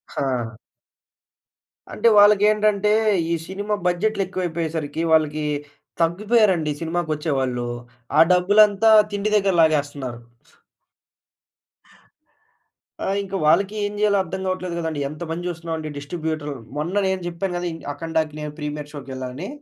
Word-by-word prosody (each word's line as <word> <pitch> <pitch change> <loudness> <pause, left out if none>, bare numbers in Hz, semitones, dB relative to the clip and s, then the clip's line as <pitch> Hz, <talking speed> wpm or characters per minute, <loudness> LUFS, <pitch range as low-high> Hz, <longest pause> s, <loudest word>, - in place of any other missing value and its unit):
హా! 125 -5 -2 1.4
అంటే 230 - +2
వాళ్ళకేంటంటే 210 0 +4 0.4
ఈ - - +2
సినిమా 205 +2 -2
బడ్జెట్‌లేక్కువైపోయేసరికి 175 -5 -2
వాళ్ళకి 155 -1 +2 0.6
తగ్గిపోయారండి 185 -2 +2
సినిమాకొచ్చేవాళ్ళు. 150 -7 -1 0.5
ఆ - - +6
డబ్బులంతా 205 +4 +5 0.2
తిండి 205 +1 -1
దగ్గర 195 -2 +2
లాగేస్తున్నారు. 145 -6 0 2.8
ఆ! - - -2 0.2
ఇంక 195 0 -11
వాళ్ళకి 195 +7 +3
ఏం 205 - -3
జేయాలో 210 -1 +3
అర్థం 190 +2 -6
గావట్లేదు 185 -2 -3
గదండీ. 160 -3 -3
ఎంత 155 +4 -7
మంది 170 +2 -4
జూస్తున్నామండి 165 -2 -4
డిస్ట్రిబ్యూటర్. 155 0 -4 0.2
మొన్న 165 +6 -3
నేను 190 -1 -1
జేప్పాను 175 +2 -3
గదా! 175 0 -3
ఇన్ 165 - -8
అఖండా‌కి 160 0 -2
నేను 150 0 -5
ప్రీమియర్ 150 -1 -5
షో‌కేళ్ళానని. 135 +3 -6
170 Hz, 105 wpm, -22 LUFS, 150-195 Hz, 2.8 s, ఆ